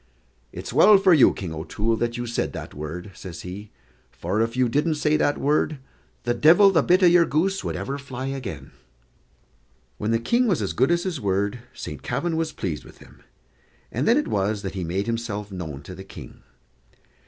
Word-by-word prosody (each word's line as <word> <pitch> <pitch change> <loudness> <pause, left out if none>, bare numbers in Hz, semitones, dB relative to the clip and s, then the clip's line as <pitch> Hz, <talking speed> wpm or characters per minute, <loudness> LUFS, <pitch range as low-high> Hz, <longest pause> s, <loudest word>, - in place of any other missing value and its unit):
"It's - - -7
well 210 0 +7
for 190 -2 +5
you, 150 - +6
King 90 -4 -6
O'Toole, 105 +8 -1
that 120 0 -2
you 120 - -3
said 120 0 -2
that - - -7
word," 80 +6 -7
says 85 -3 -9
he; 100 +4 -8 0.4
"for 105 - -2
if 115 +2 -1
you 130 -1 +3
didn't 150 +6 +1
say 150 0 +1
that 145 -1 +1
word, 150 +1 +1 0.5
the 120 - +1
divil 170 - +6
the 165 -5 +4
bit 180 +5 +3
o' - - +8
your 175 0 +6
goose 190 +6 0
would - - -3
ever 140 +1 -4
fly 135 -1 -5
agin." 100 - -6 1.3
When 105 - -2
the 115 - +3
King 235 - +1
was 190 -7 +2
as 100 -6 -2
good 130 - +2
as 170 0 +2
his 175 -7 -3
word, 100 +3 0 0.2
Saint 75 - -7
Kavin 150 +7 -2
was 160 0 -1
pleased 80 -6 -4
with - - -15
him, - - -18 0.7
and 125 +6 -1
then 235 - +5
it 300 - 0
was 100 +1 -1
that 95 - -4
he 95 -2 -4
made 90 +4 -2
himself 110 -3 -3
known 80 -7 -6
to - - -9
the - - -9
King. - - -12
120 Hz, 200 wpm, -24 LUFS, 100-155 Hz, 1.3 s, o